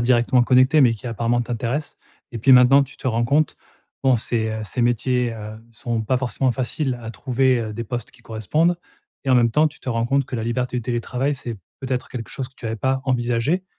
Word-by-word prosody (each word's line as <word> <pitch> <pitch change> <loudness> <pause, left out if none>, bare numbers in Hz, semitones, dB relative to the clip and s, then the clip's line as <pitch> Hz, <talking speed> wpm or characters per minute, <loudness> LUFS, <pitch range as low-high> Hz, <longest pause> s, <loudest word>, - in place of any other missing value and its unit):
directement 120 +1 +3
connectés, 130 +5 +5
mais 120 -4 +5
qui 115 +3 -10
apparemment 115 +1 0
t'intéressent. 120 +5 -3 0.3
Et 120 - -6
puis 130 +4 +5
maintenant 130 +2 +7
tu 135 - -15
te - - -7
rends 115 0 +1
compte, 145 +5 +1 0.5
bon 130 -2 +5
ces, 110 0 -1
heu 110 0 -4
ces 120 +4 -2
métiers, 120 0 +1
heu, 110 0 -8
sont 115 0 -3
pas 130 +4 +1
forcément 130 0 0
faciles 130 +1 -2
à 115 - -6
trouver, 130 +1 +1
heu, 110 -2 -4
des 115 - -4
postes 120 +1 -5
qui 115 - -20
correspondent. 155 - 0 0.5
Et 135 - 0
en - - +6
même 120 -1 +4
temps, 155 +1 +4
tu - - -14
te - - -7
rends 115 -1 0
compte 140 +1 +2
que 130 - -7
la 110 - -3
liberté 125 +2 -2
du - - -5
télétravail, 125 +4 -1
c'est, 120 -3 -6 0.2
peut-être, 130 -1 -3
quelque 115 -3 -6
chose 130 -2 -5
que 130 - -30
tu 115 - -7
avais 110 0 -2
pas 130 +4 0
envisagé 125 +7 0
125 Hz, 225 wpm, -22 LUFS, 115-130 Hz, 0.5 s, maintenant